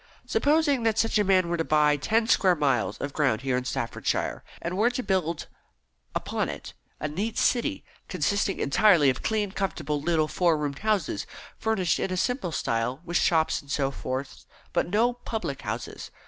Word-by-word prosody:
Supposing 290 -3 +2
that 225 -1 +1
such 225 -1 +2
a - - +4
man 185 -2 +3
were 170 0 -1
to 165 - 0
buy 150 -1 +3
ten 220 +10 +1
square 190 -6 +4
miles 125 - +1
of 140 0 -5
ground 130 -7 +1
here 130 -1 0
in 125 0 -2
Staffordshire, 125 -2 -2 0.2
and 170 +2 -4
were 220 +5 +3
to 250 +1 -3
build 170 -6 -1 0.7
upon - - -1
it - - -7 0.3
a - - -2
neat 200 +9 -3
city, 285 +4 +1 0.2
consisting 200 -1 0
entirely 150 -1 +5
of 130 - -6
clean, 210 -3 0
comfortable 190 -7 -2
little 160 -1 +1
four 170 -1 +2
roomed 145 -2 -3
houses, 200 - -1 0.3
furnished 195 -6 +1
in 190 - -1
a 185 - -1
simple 245 -3 -1
style, 120 -1 -1
with 175 +1 0
shops 160 -2 +2
and 140 - -20
so 135 -2 0
forth, 130 - -5 0.3
but - - +1
no 230 +6 +2
public 220 - -5
houses. 110 +2 -5
170 Hz, 175 wpm, -26 LUFS, 140-215 Hz, 0.7 s, entirely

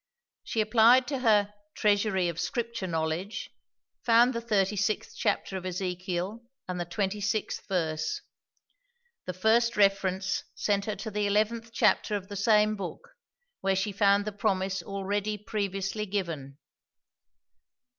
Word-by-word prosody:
She 225 - -1
applied 230 +4 +5
to 275 -3 -2
her 210 -4 +3 0.2
"Treasury 205 -3 +2
of 170 -1 -4
Scripture 230 +2 -2
Knowledge"; 165 +4 -3 0.5
found 240 +2 +5
the 235 - -3
thirty 210 -3 +1
sixth 200 +2 -1
chapter 200 -2 -1
of 185 - -7
Ezekiel, 185 +3 -3 0.3
and 180 -1 -3
the 175 - -2
twenty 195 +4 -2
sixth 205 +2 -2
verse. 180 - -1 1.0
The 180 - -4
first 225 +4 +3
reference 190 -2 +2
sent 200 -1 0
her 215 - -2
to 220 - -6
the 210 0 0
eleventh 215 +3 0
chapter 220 -2 +2
of 195 -1 -5
the 205 - -6
same 210 +1 +3
book, 195 -3 -7 0.5
where 195 0 +1
she 195 +2 0
found 200 0 +3
the 215 - -2
promise 195 -2 -1
already 200 +3 -2
previously 200 0 -3
given. 165 -9 -4
200 Hz, 135 wpm, -28 LUFS, 185-215 Hz, 1.0 s, applied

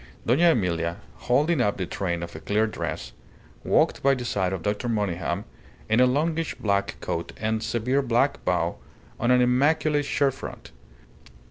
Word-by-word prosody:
Dona 155 +9 +4
Emilia, 85 - 0 0.3
holding 150 +4 +3
up 105 -4 +1
the 95 - -2
train 85 -1 -3
of 85 - -8
a - - -6
clear 105 +2 +1
dress, 110 - -4 0.5
walked - - +2
by 135 0 +4
the 125 -1 -5
side 95 -5 0
of 95 -4 -4
Dr. 105 +4 -1
Monygham, 100 -3 -1 0.4
in 110 +2 +2
a 125 - +6
longish 160 +5 0
black 100 -2 0
coat 85 0 -3
and 110 0 -1
severe 125 +5 0
black 120 -2 +1
bow - - 0 0.4
on 120 - +1
an 125 0 +5
immaculate 145 +4 +2
shirtfront. 140 -1 -2
115 Hz, 155 wpm, -25 LUFS, 100-135 Hz, 0.5 s, a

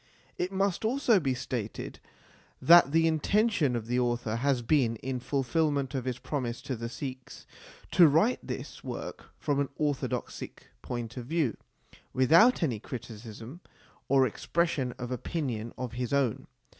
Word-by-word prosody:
It 180 +1 -1
must 195 0 0
also 235 -2 +3
be 135 -6 0
stated 120 -4 -5 0.6
that 170 -4 +7
the 165 +1 +4
intention 160 - +2
of 115 -2 -3
the 125 +2 0
author 120 -2 0
has 130 0 +1
been, 120 -2 +2
in 130 +3 -4
fulfilment 140 +1 0
of 130 -2 -2
his 125 -2 -2
promise 125 -4 -4
to 130 - -3
the 115 0 -5
Sikhs, 130 0 -7 0.5
to 170 - +7
write 165 - +3
this - - -7
work - - -6
from 145 -2 0
an 140 - 0
orthodox 145 -3 -1
Sikh - - -9
point 120 0 -5
of 120 -1 -6
view, 155 -6 0 0.6
without 165 - +5
any 120 -9 0
criticism 115 - -8 0.5
or 135 -1 +5
expres 170 +8 0
sion 125 -4 -2
of 125 0 -7
opinion 125 -4 -3
of 125 -2 -4
his 125 +1 -3
own. 135 -5 +1
130 Hz, 155 wpm, -29 LUFS, 120-160 Hz, 0.6 s, that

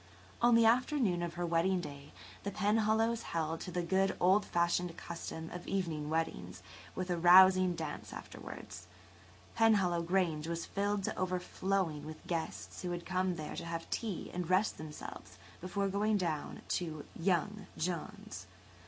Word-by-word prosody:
On 240 0 +6
the 230 0 +6
afternoon 235 - +3
of 170 -1 -3
her 175 0 -1
wedding 170 +3 +2
day–the 145 +5 -9
Penhallows 220 +3 +2
held 165 0 -2
to - - -5
the 175 0 -1
good, 190 +3 +1
old 190 +4 +5
fashioned 170 0 0
custom 165 -1 -6
of 180 0 -7
evening 165 -6 -2
weddings 95 - -2 0.3
with 185 0 -2
a 175 - +1
rousing 185 +1 +7
dance 160 -3 -5
afterwards–Penhallow 95 - -2
Grange 170 -3 0
was 170 0 -3
filled 200 0 -1
to - - -2
overflowing 185 -3 -1
with 155 0 -9
guests 165 -2 -4
who 180 - -3
had 175 -1 -4
come 185 -1 0
there 155 -2 -5
to - - -5
have 165 0 -4
tea 215 -7 -3
and 180 -1 -3
rest 190 +4 +2
themselves 155 -1 -8 0.2
before 185 +3 -1
going 205 +2 +1
down 165 -6 -3
to 155 -4 -2
"young" 190 +3 0
John's. 185 - -4
175 Hz, 145 wpm, -34 LUFS, 165-195 Hz, 0.3 s, rousing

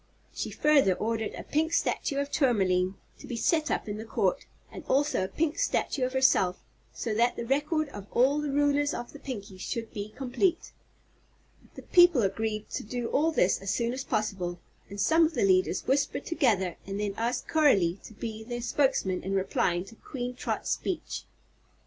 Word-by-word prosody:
She - - -3
further 280 -11 +3
ordered 225 +1 -2
a - - -7
pink 320 +2 0
statue 280 -3 0
of 280 0 -2
Tourmaline 190 -8 +2 0.2
to - - -11
be 245 - -4
set 310 +7 +1
up - - -1
in 205 0 -4
the 220 - -6
Court, - - -1 0.2
and - - -9
also 285 -6 +1
a - - -1
pink 305 +10 -1
statue 305 - 0
of 255 +1 -1
herself, 195 -9 +3 0.3
so 225 - -3
that 235 +3 +2
the 235 - -4
record 295 +4 0
of 205 -5 -9
all 270 +4 +3
the 300 - -2
rulers 290 +1 +2
of 240 - -6
the 290 - -10
Pinkies 200 -9 -7
should 230 0 -4
be 205 0 -5
complete. 275 - -1 1.0
The - - -9
people 350 -9 +6
agreed 215 +2 -2
to - - -3
do 240 +2 -4
all 315 +4 +2
this 190 - +2
as 195 - -5
soon 235 +4 0
as 260 +1 -4
possible, 195 -7 -2 0.3
and 200 - -8
some 320 +9 +4
of 320 0 +1
the - - +2
leaders 185 -1 +2
whispered 280 +1 0
together 210 - +1
and 200 +1 -4
then 205 -1 -1
asked 240 +3 -2
Coralie 200 - +3
to 220 - -12
be 220 0 -6
their 240 +1 -5
spokesman 255 -9 +1
in 195 +1 -2
replying 185 -2 0
to 225 - -14
Queen 250 -2 -5
Trot's 250 - -3
speech. 370 - -3
240 Hz, 185 wpm, -28 LUFS, 200-285 Hz, 1.0 s, people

